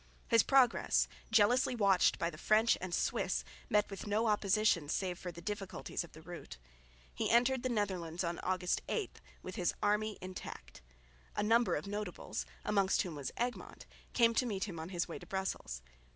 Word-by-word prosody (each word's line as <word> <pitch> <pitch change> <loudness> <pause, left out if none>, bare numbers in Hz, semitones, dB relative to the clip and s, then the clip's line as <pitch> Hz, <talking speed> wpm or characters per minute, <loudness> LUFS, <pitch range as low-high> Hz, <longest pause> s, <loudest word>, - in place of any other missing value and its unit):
His 230 -2 +6
progress, 260 -1 +4 0.2
jealously 235 +4 +4
watched 200 -5 +4
by 170 - -1
the 155 - -11
French 220 +4 +4
and 185 -1 -4
Swiss, - - 0 0.3
met 210 0 +3
with 195 - -6
no 215 +3 +1
opposition 210 -6 +2
save 180 0 -1
for 180 - -5
the 170 0 -11
difficulties 200 -1 -4
of 170 - -14
the 155 - -13
route. 175 - -9 0.6
He - - -1
entered 245 +2 +4
the 255 - -1
Netherlands 185 -6 -1
on 170 0 -2
August 185 -1 0
8, 440 -4 -3 0.2
with 185 +3 -7
his 180 -3 0
army 210 +1 +1
intact. 185 - -8 0.5
A - - 0
number 230 +2 +3
of - - -3
notables, 205 -2 -4 0.2
amongst 200 -2 +2
whom 175 - -5
was 145 -3 -4
Egmont, 245 +1 -4 0.3
came 230 -1 +5
to 250 +2 +1
meet 195 -4 -2
him 180 -6 -5
on 160 +2 -6
his 175 -2 -1
way 170 - -6
to - - -13
Brussels. 190 - -3
200 Hz, 180 wpm, -34 LUFS, 175-220 Hz, 0.6 s, His